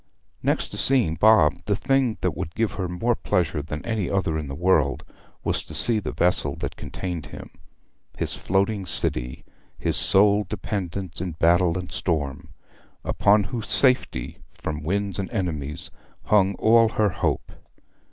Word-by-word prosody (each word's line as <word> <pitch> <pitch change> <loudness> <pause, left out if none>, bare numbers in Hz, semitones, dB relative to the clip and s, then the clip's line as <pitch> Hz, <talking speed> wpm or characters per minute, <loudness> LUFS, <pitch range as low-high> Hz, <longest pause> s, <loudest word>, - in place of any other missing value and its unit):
Next - - 0
to - - -5
seeing 125 -12 +4
Bob, 90 -3 +4
the 100 - +1
thing 130 0 +1
that 90 -5 -1
would 85 0 -6
give 115 -1 0
her 95 -2 -4
more 115 +8 0
pleasure 85 -8 -1
than 75 +1 -7
any 110 -6 -2
other 95 -5 0
in 75 -2 -3
the 70 - -6
world 80 -4 +1 0.4
was - - -1
to 80 - -5
see 110 +8 +4
the - - -5
vessel 85 -5 +1
that - - -5
contained 85 -4 -6
him - - -10 0.7
his - - -2
floating 95 +1 -1
city, 60 -5 -2 0.3
his - - -1
sole 105 +1 +4
dependence 95 -3 -5
in 90 -2 -4
battle 85 +2 +2
and 90 -1 -6
storm 80 -1 -3 0.6
upon 105 +1 +3
whose 115 +1 -5
safety 125 - +3 0.2
from 75 -1 -5
winds 100 +4 -2
and 95 - -3
enemies 75 - -4 0.3
hung 100 -2 +3
all 115 +2 +4
her 105 -1 +3
hope. - - -2
90 Hz, 155 wpm, -24 LUFS, 80-105 Hz, 0.7 s, seeing